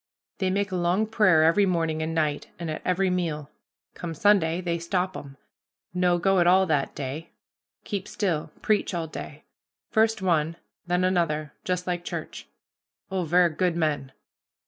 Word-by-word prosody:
"They 190 -1 +1
make 200 +1 0
a - - -2
long 175 +5 +2
prayer 210 -8 +4
every 195 +5 +4
morning 165 -3 0
and 160 +1 -2
night, 150 -2 0
and 170 -2 -4
at 155 - -5
every 185 +1 +1
meal. 155 -5 -2 0.4
Come 165 -2 -6
Sunday, 175 -2 +3
they 170 -2 -2
stop 180 +2 -1
'em, 140 -1 -9 0.6
no 180 -1 +2
go 190 +2 +3
at 175 - +4
all 190 +2 +6
that 150 -6 0
day 145 +4 -5 0.5
keep 200 -2 -4
still 165 -7 -2
preach 210 -3 +1
all 165 -1 -1
day 150 -1 -8 0.5
first 220 0 +3
one, 165 -4 +1 0.3
then 180 +1 +1
another, 165 -5 0
just 180 -1 -1
like 175 -1 -2
church. - - -6 0.6
Oh, 185 -2 -1
ver' 175 +2 +4
good 175 +2 0
men. 150 -5 -1
175 Hz, 165 wpm, -26 LUFS, 160-185 Hz, 0.6 s, all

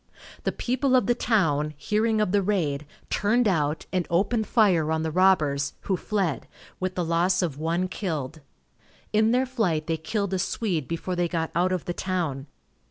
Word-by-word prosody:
The - - +2
people 260 +2 0
of 250 -5 +4
the 240 - +3
town, 155 -11 +1
hearing 215 +5 +1
of 210 - +1
the 205 0 +3
raid, 155 -8 -1 0.2
turned 225 +4 +2
out, 155 -5 0
and 180 -2 0
opened 210 +6 +1
fire 180 -9 +3
on 160 0 0
the 160 - -2
robbers, 150 -6 +3
who 190 - 0
fled, 190 -5 -2 0.3
with 185 0 -2
the 180 - -1
loss 175 +3 +2
of 150 -5 -3
one 170 +3 0
killed. 160 -6 -4 0.7
In 215 +1 +4
their 250 +3 +3
flight 200 -12 0
they 165 0 -1
killed 200 +4 -2
a 190 - 0
Swede 180 - -1
before 170 +2 -3
they 175 0 +1
got 165 -1 -2
out 180 +2 +2
of 185 -2 -2
the 175 - -2
town. 165 -8 -2
180 Hz, 180 wpm, -26 LUFS, 160-210 Hz, 0.7 s, of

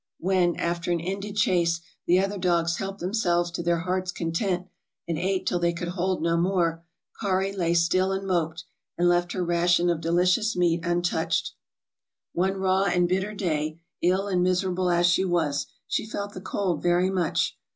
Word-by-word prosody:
When, 180 -1 +1
after 170 0 -2
an 170 - +1
ended 195 +4 -4
chase, 175 -5 +2 0.3
the 180 +2 +5
other 195 +1 -1
dogs 170 -2 +1
helped 195 0 -4
themselves 175 -3 +1
to 170 - -4
their 170 0 +1
hearts' 185 +1 -1
content, 175 +2 -2 0.4
and 170 - -1
ate 185 +3 -1
till 175 - 0
they 170 0 +1
could 175 0 -4
hold 185 0 -1
no 170 0 +2
more, 170 -2 +1 0.4
'Kari' 195 -2 0
lay 170 -3 +1
stifl 185 +3 +2
and 195 - -7
moped, 170 -3 -1 0.3
and 175 - +3
left 175 0 +2
her 180 -2 -1
ration 175 0 +3
of 165 -2 -2
delicious 180 +7 +2
meat 170 -1 +1
un 175 0 0
touched. 165 -2 0 0.8
One 190 +2 0
raw 190 0 +2
and 175 -2 +2
bitter 190 +4 -1
day, 155 -4 -2 0.2
ill 190 +3 +2
and 185 -3 +1
miserable 185 0 +1
as 175 0 +3
she 175 +2 +3
was, 150 -6 0 0.2
she - - -2
felt 205 -1 -4
the 185 - -8
cold 190 -2 -2
very 175 +2 +2
much. 180 -4 0
175 Hz, 180 wpm, -26 LUFS, 170-190 Hz, 0.8 s, the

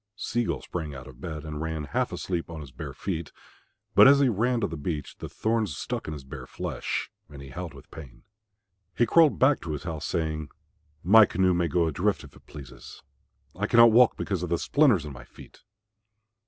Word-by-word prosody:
Sea 120 +3 -2
gull - - -3
sprang 80 -5 -5
out 65 -1 -9
of 65 -2 -14
bed 80 -3 -6
and 75 -1 -6
ran 80 -1 -3
half - - -2
asleep 85 -3 -4
on 80 -2 -7
his 70 -3 -11
bare 60 - -8
feet. 85 -4 -4 0.6
But - - +8
as 140 +1 +7
he 140 -2 +4
ran 120 +3 +1
to - - +2
the 80 - -6
beach 75 -1 -5
the - - -7
thorns 110 -7 -1
stuck - - -4
in 75 - -4
his 75 -3 -8
bare 65 - -9
flesh, - - -4 0.2
and 70 -2 -11
he 70 0 -10
howled 85 +5 -7
with - - -15
pain. 70 -7 -12 0.7
He 120 - +4
crawled 160 +5 +4
back 135 +2 +3
to 80 - -5
his 75 - -6
house, 80 -3 -5
saying, 80 -2 -2 0.5
"My 105 +5 +7
canoe 95 0 +2
may 85 -1 +1
go 85 0 +1
adrift 80 -3 -1
if - - -14
it - - -20
pleases; 60 -4 -12 0.5
I 105 +3 -2
cannot 115 0 +7
walk 120 +2 +5
because 95 -4 -2
of 90 - -4
the 85 - +1
splinters 125 - +3
in 75 - -7
my - - -11
feet." - - -16
85 Hz, 210 wpm, -26 LUFS, 75-110 Hz, 0.7 s, But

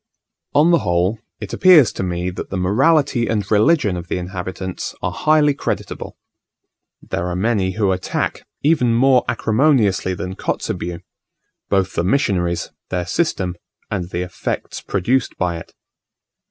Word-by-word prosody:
On 155 +4 +5
the 170 - +5
whole, 90 +4 0 0.2
it 105 -2 -7
appears 170 - +6
to - - -4
me 90 0 -2
that 90 - -7
the 95 - -3
morality 125 - +2
and 105 -3 0
religion 110 - +3
of 85 -1 -6
the - - -2
inhabitants 95 0 -5
are - - 0
highly 150 -1 +3
creditable. 140 - -4 0.9
There 85 - -3
are 90 - -2
many 95 -1 0
who 100 -1 +1
attack, 90 0 -2 0.2
even 140 -6 +3
more 130 +1 +4
acrimoniously 110 -6 +2
than 95 -1 -5
Kotzebue, 85 0 -3 0.7
both 95 -2 +1
the - - 0
missionaries, 90 -6 0 0.2
their 90 -1 -2
system, 95 - -1 0.4
and 90 -3 -2
the 90 0 -2
effects 90 -1 -4
produced 115 +7 0
by 85 -2 -1
it. - - -13
100 Hz, 140 wpm, -20 LUFS, 90-130 Hz, 0.9 s, appears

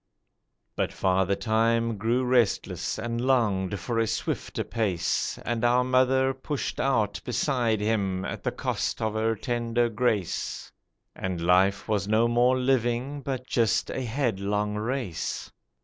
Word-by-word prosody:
But - - -1
Father 95 +1 +1
Time 115 0 +1
grew 120 +4 +1
restless 110 -7 +1
and 115 +1 -3
longed 105 -7 +1
for 115 +6 -2
a 115 - +2
swifter 110 - -2
pace, 95 -7 -1
And 120 -1 -1
our 120 +1 +4
mother 130 +1 +3
pushed 135 +2 -4
out 110 -7 +1
beside 120 -4 0
him 100 -3 0
at - - -5
the - - -1
cost - - -2
of 110 -1 -1
her 110 +1 +1
tender 120 +1 0
grace, 110 -5 -1 0.4
And 95 -2 -3
life 95 +3 +3
was 105 -3 0
no 110 +2 +3
more 120 +2 +3
living 130 +2 0
but 130 -2 -4
just 115 -3 +1
a - - -3
headlong 105 -5 -1
race. 110 -5 -3
115 Hz, 135 wpm, -27 LUFS, 105-125 Hz, 0.4 s, our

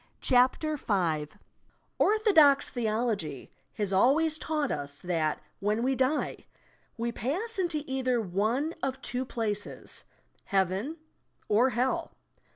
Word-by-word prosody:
CHAPTER 260 +5 +3
V - - -17
THE - - -21
SPIRIT 165 -7 0
WORLD - - -22 0.8
Orthodox 315 -11 +5
theology 215 - -2 0.2
has 205 -2 -2
always 305 +10 +3
taught 305 -3 -1
us 145 -1 -4
that, 165 -4 0 0.2
when 210 +3 0
wa 265 +1 +2
"die," 265 +3 0 0.6
we 235 +1 -1
pass 370 - -3
into 335 -5 -1
either 260 -3 0
one 220 - 0
of 265 0 -2
two 250 +1 -2
places: 210 -4 -4 0.4
Heaven 195 - 0 0.5
or 230 +5 +4
Hell. 250 +2 -1
245 Hz, 125 wpm, -29 LUFS, 200-280 Hz, 0.8 s, Orthodox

